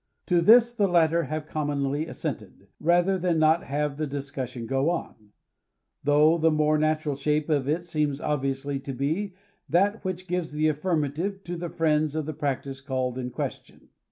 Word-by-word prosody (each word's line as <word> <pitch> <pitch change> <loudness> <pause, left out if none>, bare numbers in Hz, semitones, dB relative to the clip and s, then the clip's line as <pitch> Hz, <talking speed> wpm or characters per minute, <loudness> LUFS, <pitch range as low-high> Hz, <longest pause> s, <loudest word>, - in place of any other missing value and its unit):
To 175 -2 +3
this 235 +6 +7
the 210 -4 +1
latter 170 -2 +3
have 155 +2 -4
commonly 145 0 -2
assented, 105 - -6
rather 175 +3 +3
than 175 -2 +1
not 155 +2 +3
have 145 0 -2
the 155 0 -2
discussion 135 -4 -5
go 135 +5 +1
on; 110 -11 -5 0.7
though 150 +3 +4
the 160 +1 +4
more 155 0 +2
natural 155 -1 0
shape 150 +2 0
of 140 -2 +1
it 165 +3 0
seems 150 -4 -1
obviously 140 -1 -2
to' 135 0 -6
be 160 +9 -2 0.3
that 200 +5 +2
^which 185 -1 -4
gives 180 -3 -2
the 155 +1 +2
affirmative 165 +4 -1
to 175 - -5
the 175 0 -4
friends 155 -2 +1
of 155 -2 -1
the 155 - -4
practice 140 -2 -3
called 130 -2 -2
in 125 -1 -3
question. - - -6
155 Hz, 170 wpm, -26 LUFS, 140-170 Hz, 0.7 s, this